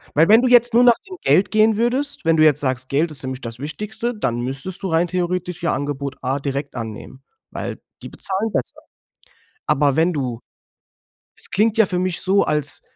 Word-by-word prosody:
Weil 160 +5 +4
wenn 225 +3 +7
du 255 - +2
jetzt 240 -1 +5
nur 240 - +6
nach 240 -2 +5
dem 370 - -8
Geld 190 - +3
gehen 215 0 +3
würdest, 250 0 -1
wenn 165 0 +3
du 155 - +4
jetzt 150 -3 +4
sagst: 130 -2 -2
„Geld 155 +4 +1
ist 140 -3 -6
nämlich 130 0 -5
das 115 -1 -7
Wichtigste“, 210 - -4
dann 120 - -2
müsstest 135 - -2
du 190 - -2
rein 165 +1 +2
theoretisch 180 0 -3
ja 170 - +1
Angebot 140 -1 -4
A 135 +2 -1
direkt 140 0 -4
annehmen, 115 +3 -8 0.3
weil - - -6 0.2
die - - -7
bezahlen 200 +3 -3
besser. - - -2 0.9
Aber 140 -1 +2
wenn 165 +2 +2
du 125 -5 -3 1.0
es - - -4
klingt 220 +2 +1
ja 220 - +6
für 180 -1 -1
mich 185 -2 -1
so, 195 +1 +3
als 150 -1 -1
165 Hz, 200 wpm, -20 LUFS, 140-210 Hz, 1.0 s, wenn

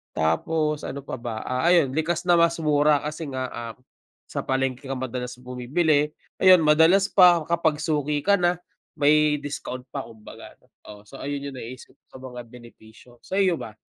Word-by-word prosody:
tapos 150 - 0
ano 140 - -6
pa - - -5
ba, 115 -2 -5
ah, 130 +5 -2
ayun 170 -7 +4
likas 160 +2 -1
na 175 - +6
mas 170 0 +3
mura 150 -1 +3
kasi 155 +2 -5
nga, 130 -1 -3
ah, 115 -1 -7 0.6
sa - - -3
palengke 130 0 -2
ka 135 - -3
madalas 125 -1 -5
bumibili, 145 +5 0 0.3
ayun 185 -2 +7
madalas 160 +6 +5
pa 180 -3 +6
kapag 165 -3 +1
suki 150 -2 -1
ka 200 0 +4
na 175 0 +1 0.4
may 150 +1 +4
discount 130 -3 -6
pa 140 - -4
kumbaga. 110 -2 -13 0.3
Oo, 105 0 -12
so 135 - -12
ayun 140 0 -4
yung 130 - -10
naiisip 125 +2 -10 0.2
ko - - -19
na - - -15
mga 125 - -7
benepisyo, 120 0 -16
sa - - -6
iyo 185 -3 +3
ba? 110 - -9
145 Hz, 175 wpm, -24 LUFS, 125-160 Hz, 0.6 s, ayun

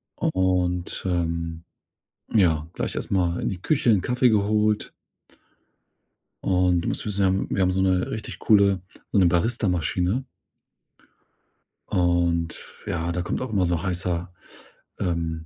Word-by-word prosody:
Und, 90 -1 0
ähm, 85 -2 -2 0.7
ja, 80 -7 +3
gleich - - -3
erst - - -4
mal 90 -3 +1
in - - -1
die 90 -2 -5
Küche, 140 -1 +1
'n 100 -4 +3
Kaffee 125 +3 +2
geholt. 105 0 +1 1.5
Und 90 -2 +2
du - - -4
musst - - -2
wissen, 100 -2 -1
wir - - +5
haben 95 +1 0
wir 95 - 0
haben 90 - +2
so 95 +1 0
'ne 95 -1 +2
richtig 110 - -6
coole, 100 -3 +4 0.3
so - - +1
'ne 95 - +5
Baristamaschine. 90 - +1 1.7
Und 85 -2 +1 0.4
ja, 85 0 -2
da 90 +1 -2
kommt 90 - -3
auch 130 - -4
immer 95 -4 +2
so 85 -2 0
heißer 90 -1 -2 0.7
ähm, 80 -2 -2
90 Hz, 140 wpm, -24 LUFS, 85-100 Hz, 1.7 s, wir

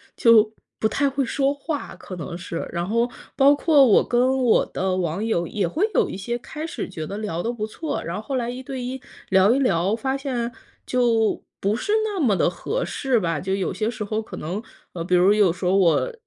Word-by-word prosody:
就 220 -2 +5 0.3
不 220 - +2
太 280 +3 +1
会 275 0 -1
说 275 +3 +1
话， 290 +1 -5
可 185 - -9
能 170 0 -6
是。 175 -2 -5
然 170 +1 -2
后 230 +3 +1 0.3
包 280 +1 +6
括 285 -2 +5
我 215 - +4
跟 255 +2 +2
我 225 - +4
的 185 0 -1
网 180 +3 -1
友 175 -7 0
也 195 -2 -1
会 390 - 0
有 - - +3
一 - - -5
些 235 +5 -3
开 305 +5 -7
始 330 - -5
觉 160 -4 -5
得 200 - -5
聊 175 -5 -3
得 235 - -1
不 215 -3 -3
错， 310 +7 -4
然 170 - -4
后 210 - -4
后 265 +5 -4
来 240 -1 -1
一 250 +1 -5
对 260 -1 -5
一 255 +1 -5 0.3
聊 190 +4 +5
一 275 - +1
聊， 195 -4 +2
发 265 +3 -2
现 245 -4 -3 0.3
就 230 -3 +1 0.2
不 200 +2 +1
是 400 - -3
那 410 -4 -3
么 225 -10 +3
地 170 - +2
合 475 - -3
适 260 -4 0
吧。 165 -4 -1
就 190 +3 -2
有 190 - -2
些 215 0 -1
时 220 -2 -4
候 215 +1 -2
可 220 - -9
能， 180 +7 -4 0.3
呃， 170 - -4
比 180 +1 +1
如 185 +3 +5
有 205 -5 +4
时 180 +2 -6
候 180 +2 +3
我 195 - +3
220 Hz, 245 characters per minute, -23 LUFS, 185-265 Hz, 0.3 s, 包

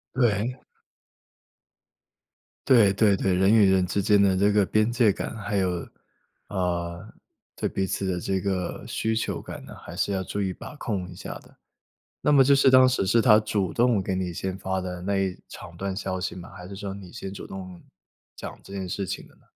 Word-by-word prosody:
对。 120 -1 +1 2.1
对 115 -7 +6
对 100 0 +3
对， 95 0 0
人 95 +3 +4
与 105 -4 +6
人 95 -1 +3
之 100 - -1
间 100 +1 +4
的 95 -2 +4
这 100 +2 +3
个 105 -1 +3
边 110 +5 +2
界 120 -4 +4
感， 110 - -5
还 105 -1 -2
有， 90 -3 -1 0.6
啊， 85 -3 -2 0.6
对 - - -2
彼 95 - -1
此 95 +1 -2
的 90 -1 -1
这 95 +1 -1
个 95 -3 -2
需 110 0 -1
求 115 - -2
感 - - -9
呢， - - -11
还 - - -10
是 100 - 0
要 95 -1 -1
注 100 +2 -3
意 95 - 0
把 120 - -9
控 100 -9 -3
一 90 - -10
下 - - -7
的。 - - -21 0.7
那 150 - +2
么 135 -2 +7
就 140 +1 +5
是 135 -1 +5
当 130 0 +7
时 125 -6 0
是 115 +4 +4
她 110 -3 +6
主 105 -4 -1
动 120 -4 +2
给 95 0 -2
你 90 -2 -2
先 95 +2 -4
发 95 0 -2
的 90 -1 -5
那 100 +1 0
一 95 -2 -1
长 85 - -11
段 95 +1 -3
消 95 -2 -3
息 90 - -3
吗？ 90 -1 -9
还 90 0 -9
是 100 - -8
说 100 0 -5
你 95 -3 -11
先 95 -4 -6
主 100 - -8
动 95 -2 -8 0.6
讲 - - -8
这 100 - -11
件 95 -2 -4
事 95 +1 -2
情 - - -5
的 - - -23
呢？ - - -28
95 Hz, 225 characters per minute, -26 LUFS, 95-105 Hz, 2.1 s, 么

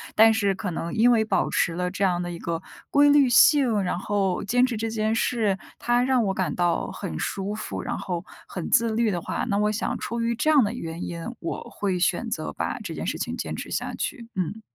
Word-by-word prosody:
但 225 +1 +7
是 200 -3 +1
可 200 -1 -4
能 165 0 -4
因 235 +2 +5
为 225 -2 +3
保 - - +1
持 170 - +1
了 180 +1 -2
这 200 - -7
样 180 -2 +1
的 175 0 -4
一 170 - -7
个 165 -1 -3 0.3
规 290 0 +5
律 285 -2 +6
性， 245 -3 +5
然 180 - -1
后 195 -2 0
坚 245 +5 +3
持 245 -3 -3
这 225 +1 -2
件 220 0 0
事， 220 -3 +1 0.2
它 240 0 +2
让 255 -1 +2
我 195 -2 0
感 185 -1 -1
到 175 -1 0
很 80 - -5
舒 195 +1 -3
服， 100 - -5
然 - - -3
后 175 -2 -4 0.2
很 180 - -5
自 230 0 +3
律 225 0 +1
的 175 - -1
话， - - -3
那 200 - +1
我 210 +1 +2
想 215 - -2
出 235 0 -3
于 230 0 +1
这 245 +7 +1
样 295 -4 +6
的 205 - 0
原 165 -7 -6
因， 170 -1 -5
我 165 - -4
会 190 -3 -2
选 175 - +1
择 - - -3
把 - - -3
这 - - -6
件 - - -5
事 - - -2
情 - - -3
坚 - - -4
持 - - -7
下 - - -3
去， 235 -5 -4
嗯。 190 +4 -3
210 Hz, 255 characters per minute, -25 LUFS, 180-235 Hz, 0.3 s, 但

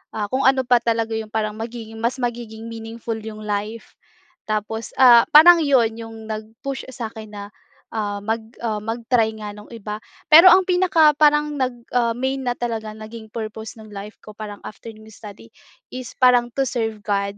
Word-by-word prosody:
ah, 205 -2 -3
kung 260 +1 +2
ano 265 0 +3
pa 245 -1 +4
talaga 230 -1 -1
'yong 220 -1 -3
parang 215 -1 -2
magiging 225 -1 -7
mas 235 +2 0
magiging 230 -1 -5
meaningful 225 0 -6
'yong 215 -1 -9
life. 210 +2 -5 0.5
Tapos 215 +1 -3
ah 240 -3 +8
parang 340 +3 +9
'yon 260 -6 +3
'yong 225 -1 -9
nag-push 220 +5 -6
sa 230 -2 -4
akin 220 -2 -10
na, 205 -1 -7 0.5
ah, 205 -2 -2
mag 225 +2 -2 0.2
ah 220 -2 -1
mag-try 225 0 0
nga 210 -1 -6
ng 210 - -13
iba. 210 -2 -6 0.3
Pero 335 +4 +10
ang 375 - +4
pinaka 350 -4 +4
parang 295 0 +3
nag 250 -3 -2
ah 235 -1 +2
main 265 +1 -2
na 245 - +1
talaga 225 -3 -4
naging 220 0 -10
purpose 220 0 -7
ng 215 - -12
life 200 +2 -8
ko 215 - -12
parang 210 -2 -7
after 225 +2 -10
nung 215 0 -16
study, 200 - -12 0.4
is 255 -2 -7
parang 245 -1 +4
to 275 - -1
serve 225 -3 -3
God 200 -1 -2
225 Hz, 180 wpm, -21 LUFS, 215-245 Hz, 0.5 s, Pero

